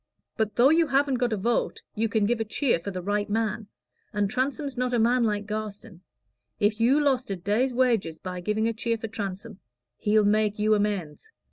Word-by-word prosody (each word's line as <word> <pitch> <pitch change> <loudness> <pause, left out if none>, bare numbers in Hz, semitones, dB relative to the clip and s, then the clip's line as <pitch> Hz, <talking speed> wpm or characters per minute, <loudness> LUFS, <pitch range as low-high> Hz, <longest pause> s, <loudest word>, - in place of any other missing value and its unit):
But 220 -2 -1
though 255 +4 +5
you 325 0 +4
haven't 275 -2 +1
got 245 -1 +1
a 215 - 0
vote 230 +4 -1
you 225 +1 -1
can 220 -2 +1
give 235 +2 0
a - - +1
cheer 225 - 0
for 170 - -6
the 185 -2 -5
right 205 +2 -1
man, 215 0 -1 0.4
and 205 -1 -1
Transome's 275 +2 -2
not 250 0 0
a - - +2
man 235 +2 +3
like 210 -1 -1
Garstin; 210 -3 -6 0.6
if 210 +1 +1
you 250 +6 +4
lost 265 -3 +1
a 195 - -1
day's 210 +9 0
wages 235 -10 +1
by 180 +1 -6
giving 210 +4 0
a 230 - 0
cheer 230 +1 -1
for 225 - -5
Transome, 205 -1 -6 0.4
he'll 210 0 +2
make 210 0 +2
you 215 +1 +2
amends. 205 - -2
220 Hz, 205 wpm, -26 LUFS, 205-245 Hz, 0.6 s, though